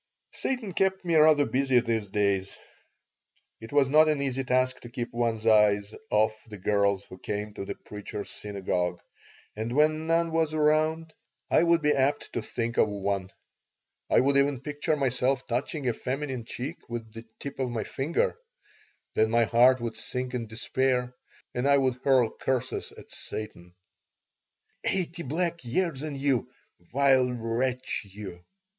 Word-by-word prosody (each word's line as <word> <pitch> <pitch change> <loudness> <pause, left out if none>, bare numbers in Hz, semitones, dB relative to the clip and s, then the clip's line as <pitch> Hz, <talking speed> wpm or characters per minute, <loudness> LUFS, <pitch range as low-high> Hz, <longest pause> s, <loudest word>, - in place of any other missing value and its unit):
Satan 240 -8 -2
kept 190 +1 +1
me 170 - 0
rather 155 -2 +6
busy 135 -2 +3
these 115 -3 -1
days. 100 -1 0 1.0
It 115 - -10
was 145 -2 +4
not 155 +3 +6
an 150 -2 +1
easy 135 -1 -1
task 130 0 +1
to 120 - -11
keep 120 -1 -5
one's 115 -2 -1
eyes 105 -2 +4 0.2
off 110 +1 +2
the 105 - -8
girls 100 0 +1
who 95 - -13
came 105 +2 -4
to 100 - -6
the - - -5
Preacher's 105 0 -7
Synagogue, 90 -3 -2 0.6
and 110 +3 -3
when 155 +1 +3
none 165 0 +2
was 160 -1 +1
around 155 +1 +2 0.4
I - - +5
would 170 -1 +3
be 150 0 +4
apt 140 +2 0
to 120 - -1
think 115 +1 -3
of 110 - +4
one. 100 -2 -2 0.8
I - - +5
would 140 +1 +3
even 140 -2 +2
picture 145 +2 -1
myself 130 -1 0
touching 130 +3 -2
a 120 - +2
feminine 130 -1 -4
cheek 135 +7 -6
with 115 -2 -6
the 115 0 -9
tip 140 -1 -7
of 130 -2 0
my 115 -3 -2
finger. 170 - -1 0.7
Then 110 0 +3
my 115 +1 +4
heart 125 +3 +5
would 115 -1 -4
sink 125 0 -4
in 120 -2 -3
despair 125 +2 0 0.4
and 125 +3 0
I 140 0 +6
would 130 -2 +1
hurl 130 -5 +4
curses 130 -2 -2
at - - -14
Satan 90 -5 -7 1.1
"Eighty 175 -2 -1
black 170 +3 -2
years 140 +3 -1
on 150 -2 -4
you, 135 -4 0 0.4
vile 130 -1 +4
wretch 125 +2 -2
you!" 95 -3 -9
125 Hz, 160 wpm, -27 LUFS, 110-145 Hz, 1.1 s, rather